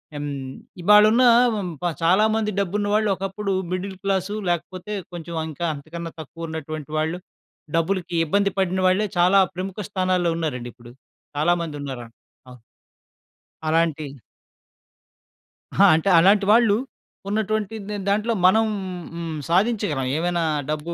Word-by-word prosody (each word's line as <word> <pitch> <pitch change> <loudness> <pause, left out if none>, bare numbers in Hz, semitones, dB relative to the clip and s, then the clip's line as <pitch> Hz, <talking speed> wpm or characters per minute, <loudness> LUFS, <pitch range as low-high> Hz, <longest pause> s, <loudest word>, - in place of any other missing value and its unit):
హ్మ్, 145 0 -4 0.5
ఇవాలున్న 210 +6 +6 0.3
వ - - -2
హ్మ్, 180 - -4 0.3
చాలా 185 +6 +4
మంది 215 -1 0
డబ్బున్న 200 +2 -1
వాళ్ళు 215 0 +2
ఒకప్పుడు 195 +1 -3 0.2
మిడిల్ 190 +1 -4
క్లాసు, 195 +1 -1
లేకపోతే 185 +4 -3 0.2
కొంచెం 170 -1 -7
అంకా 160 +2 -5
అంతకన్నా 165 +3 -7
తక్కువున్నటువంటి 155 -1 -7
వాళ్ళు. 160 +3 -1 0.6
డబ్బులకి 175 0 -1
ఇబ్బంది 200 +4 +1
పడిన 190 -1 +1
వాళ్ళే 185 +3 +2
చాలా 180 +3 +5 0.2
ప్రముఖ 185 +2 -5
స్థానాల్లో 185 -3 +1
ఉన్నారండి 125 -7 -3
ఇప్పుడు. 120 0 -15 0.5
చాలా 155 +4 +3
మందున్నారు 145 -5 -6
అన్ 115 - -24 0.4
అ - - -10 1.1
అలాంటి 160 -1 +1 1.7
ఆ! - - +6
అంటే 165 +5 0
అలాంటి 195 +4 +5
వాళ్ళు, 225 -2 +5 0.5
ఉన్నటువంటిద్ 215 0 -2 0.2
దాంట్లో 210 +3 +1
మనం 220 +5 +5 0.5
హ్మ్, 165 -2 -4
సాధించగలం 185 - +1
ఏవైనా 175 +1 0 0.3
డబ్బు 155 +2 -3
180 Hz, 120 wpm, -23 LUFS, 160-200 Hz, 1.7 s, ఇవాలున్న